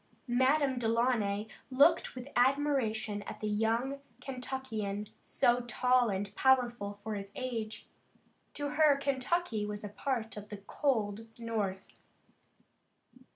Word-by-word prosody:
Madame 260 Hz, +2 st, +3 dB
Delaunay 225 Hz, -3 st, +1 dB, 0.2 s
looked 285 Hz, +5 st, +4 dB
with 250 Hz, +1 st, -7 dB
admiration 245 Hz, -6 st, +2 dB
at -, -, -7 dB
the -, -, -4 dB
young 230 Hz, +6 st, 0 dB, 0.2 s
Kentuckian, 250 Hz, -6 st, -4 dB
so 240 Hz, 0 st, +2 dB
tall 245 Hz, 0 st, +2 dB
and 200 Hz, 0 st, -2 dB
powerful 240 Hz, -6 st, +2 dB
for 220 Hz, 0 st, -3 dB
his 200 Hz, -1 st, -5 dB
age. 225 Hz, -4 st, -4 dB, 0.7 s
To 290 Hz, -1 st, -2 dB
her, 300 Hz, -1 st, +5 dB
Kentucky 275 Hz, -2 st, 0 dB
was 210 Hz, 0 st, -4 dB
a 205 Hz, -, -4 dB
part 225 Hz, 0 st, -3 dB
of 210 Hz, 0 st, -8 dB
the 210 Hz, -, -6 dB
cold 220 Hz, -1 st, -1 dB
North. 215 Hz, -5 st, -3 dB
240 Hz, 115 wpm, -32 LUFS, 210-265 Hz, 0.7 s, her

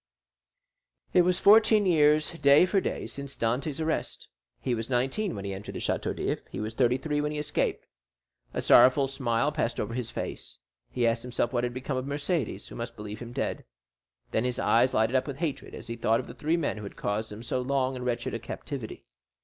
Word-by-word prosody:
It 180 Hz, -, +7 dB
was 180 Hz, 0 st, +2 dB
fourteen 215 Hz, +1 st, +6 dB
years, 155 Hz, -3 st, +4 dB
day 145 Hz, 0 st, +5 dB
for 195 Hz, +1 st, +1 dB
day, -, -, -3 dB
since 140 Hz, -1 st, -7 dB
Dantès' 135 Hz, +6 st, -1 dB
arrest. 160 Hz, 0 st, -3 dB, 0.3 s
He 125 Hz, -, -1 dB
was 115 Hz, +1 st, -3 dB
nineteen 135 Hz, -, 0 dB
when 100 Hz, -, -6 dB
he 100 Hz, -, -3 dB
entered 95 Hz, +2 st, -7 dB
the -, -, -3 dB
Château -, -, -1 dB
d'If; -, -, -2 dB
he -, -, -6 dB
was 110 Hz, +1 st, -3 dB
thirty 125 Hz, +1 st, +3 dB
three 145 Hz, +1 st, -1 dB
when 150 Hz, 0 st, -1 dB
he 150 Hz, -, -4 dB
escaped. 150 Hz, 0 st, -1 dB, 0.7 s
A -, -, -3 dB
sorrowful 130 Hz, +3 st, +6 dB
smile 130 Hz, 0 st, 0 dB
passed 120 Hz, -6 st, -1 dB
over 105 Hz, +2 st, -2 dB
his 120 Hz, -2 st, -3 dB
face; -, -, -6 dB, 0.3 s
he 125 Hz, -2 st, 0 dB
asked 115 Hz, 0 st, +2 dB
himself 120 Hz, 0 st, -2 dB
what 120 Hz, -1 st, +1 dB
had 120 Hz, 0 st, -2 dB
become 130 Hz, +1 st, -3 dB
of 130 Hz, -, -2 dB
Mercédès, 145 Hz, -, -2 dB
who -, -, -10 dB
must 115 Hz, 0 st, -5 dB
believe 105 Hz, -1 st, -7 dB
him 120 Hz, -1 st, -8 dB
dead. -, -, -3 dB, 0.7 s
Then 110 Hz, -, +1 dB
his 125 Hz, -1 st, -1 dB
eyes 125 Hz, +1 st, +3 dB
lighted 110 Hz, +4 st, +2 dB
up 130 Hz, -, +2 dB
with 140 Hz, -2 st, -5 dB
hatred 160 Hz, -4 st, -4 dB
as -, -, -9 dB
he 115 Hz, -, -5 dB
thought 115 Hz, 0 st, +2 dB
of -, -, -5 dB
the -, -, -9 dB
three 160 Hz, +3 st, 0 dB
men 150 Hz, -8 st, -1 dB
who 105 Hz, -, -7 dB
had 100 Hz, -, -8 dB
caused 105 Hz, +2 st, -2 dB
him 105 Hz, +2 st, -8 dB
so 125 Hz, +2 st, -1 dB
long 130 Hz, 0 st, 0 dB
and 125 Hz, -, -5 dB
wretched 120 Hz, -1 st, -2 dB
a -, -, -2 dB
captivity. -, -, -7 dB
130 Hz, 215 wpm, -28 LUFS, 115-150 Hz, 0.7 s, It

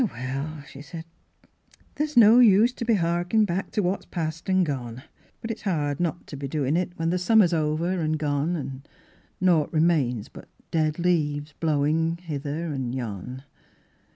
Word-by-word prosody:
'' -, -, +4 dB
Oh, 225 Hz, -, 0 dB
well," 135 Hz, +5 st, -5 dB
she 135 Hz, +1 st, -11 dB
said, 160 Hz, +3 st, -9 dB, 0.5 s
" -, -, -32 dB
there's 300 Hz, -2 st, -2 dB
no 230 Hz, +1 st, +8 dB
use 230 Hz, +1 st, +6 dB
to 235 Hz, -, -5 dB
be 230 Hz, -1 st, +3 dB
harkin' 175 Hz, +4 st, +1 dB
back 185 Hz, 0 st, -2 dB
to 210 Hz, -, +1 dB
what's 185 Hz, +3 st, -2 dB
past 165 Hz, 0 st, -4 dB
an' 185 Hz, 0 st, +3 dB
gone. 130 Hz, -5 st, -4 dB, 0.4 s
But 225 Hz, -, -4 dB
it's 225 Hz, -, -7 dB
hard 150 Hz, -8 st, -1 dB
not 175 Hz, 0 st, -2 dB
to -, -, -9 dB
be 140 Hz, 0 st, -5 dB
doin' 145 Hz, 0 st, -1 dB
it, 175 Hz, 0 st, -1 dB
when 165 Hz, 0 st, 0 dB
the 180 Hz, -, 0 dB
summer's 185 Hz, -1 st, +4 dB
over 165 Hz, +3 st, 0 dB
an' 155 Hz, 0 st, 0 dB
gone 150 Hz, +2 st, -1 dB
an' 135 Hz, -4 st, -5 dB, 0.6 s
naught 175 Hz, -5 st, +2 dB
remains 155 Hz, -9 st, +1 dB
but -, -, -13 dB, 0.2 s
dead 155 Hz, -2 st, +1 dB
leaves 155 Hz, -4 st, 0 dB
blowin' 160 Hz, +2 st, +1 dB
hither 155 Hz, -1 st, -4 dB
an' 130 Hz, -3 st, -3 dB
yon." 125 Hz, +1 st, -5 dB
160 Hz, 180 wpm, -25 LUFS, 145-180 Hz, 0.6 s, no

